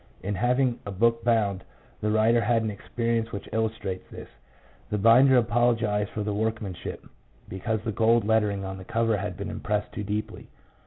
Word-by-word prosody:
In 100 +2 -2
having 125 +4 +1
a - - -7
book 115 +4 +1
bound, 105 -5 +1 0.4
the 105 - -1
writer 110 +2 +3
had 115 +1 +2
an 110 - -1
experience 115 +2 -2
which 100 - -6
illustrates 110 -4 -3
this. - - -10 0.6
The 105 - -1
binder 125 +5 +6
apologized 115 -3 +1
for 105 - -4
the 105 0 -2
workmanship, 105 -3 -4 0.4
because 110 +3 -3
the 110 - -2
gold 115 +1 +3
lettering 105 -3 +1
on 95 0 -6
the - - -9
cover 115 +3 +1
had 95 -2 -4
been 100 +1 -5
impressed 105 -2 -2
too 105 - -4
deeply. 105 +1 -4
110 Hz, 170 wpm, -26 LUFS, 100-115 Hz, 0.6 s, binder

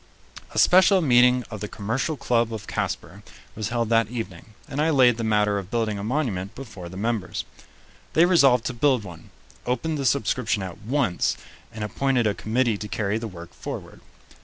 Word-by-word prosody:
A - - -9
special 190 +2 +6
meeting 125 -4 +4
of 110 - -6
the 105 - -3
Commercial 120 +10 -2
Club 120 -2 +1
of 110 -2 -6
Casper - - -4 0.3
was 110 0 -3
held 115 -2 -1
that 115 -2 +3
evening, 110 -3 -7
and 145 0 -2
I 160 - +2
laid 125 -6 +5
the 115 - -3
matter 105 -2 +2
of 95 -1 -9
building 110 -3 -1
a - - -5
monument 105 -7 -2
before 110 -10 -9
the 95 - -9
members. 110 -1 -2 0.7
They 165 - +6
resolved 135 -10 +4
to 130 - -2
build 130 -1 +2
one, 85 -4 -11 0.3
opened 135 +6 -2
the 135 - -2
subscription 120 -5 0
at 95 -2 -7
once, 115 -6 0 0.3
and 110 -2 -6
appointed 125 +3 0
a 105 - +2
committee 115 0 0
to 105 - -5
carry 105 +1 -1
the 115 - -5
work 85 -4 -11
forward. - - -8
115 Hz, 185 wpm, -24 LUFS, 105-130 Hz, 0.7 s, special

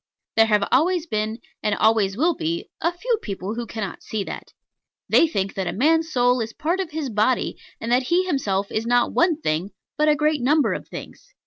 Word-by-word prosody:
There 225 0 +5
have 210 -2 +2
always 340 +4 +3
been, 215 -5 -2 0.2
and 210 -1 +1
always 215 -2 +2
will 335 +6 +3
be, 170 - -3
a 340 - +2
few 450 +6 -1
people 195 0 -4
who 235 0 -5
cannot 210 -2 -5
see 215 -2 -3
that. - - -8 0.6
They 330 - +5
think 195 -11 -2
that 190 -2 -3
a - - 0
man's 320 +7 +2
soul 245 -2 +3
is 225 0 -4
part 330 +5 -1
of 375 -4 -2
his 300 -5 -4
body, 220 +4 +1 0.2
and 230 - -4
that 250 +1 +4
he 355 +2 +3
himself 205 - -1
is 220 +1 -2
not 245 0 +2
one 340 -3 +2
thing, 170 - -2 0.3
but 305 0 +4
a 300 - +5
great 300 -1 +1
number 295 +4 +3
of - - -6
things. - - -10
245 Hz, 210 wpm, -23 LUFS, 210-315 Hz, 0.6 s, There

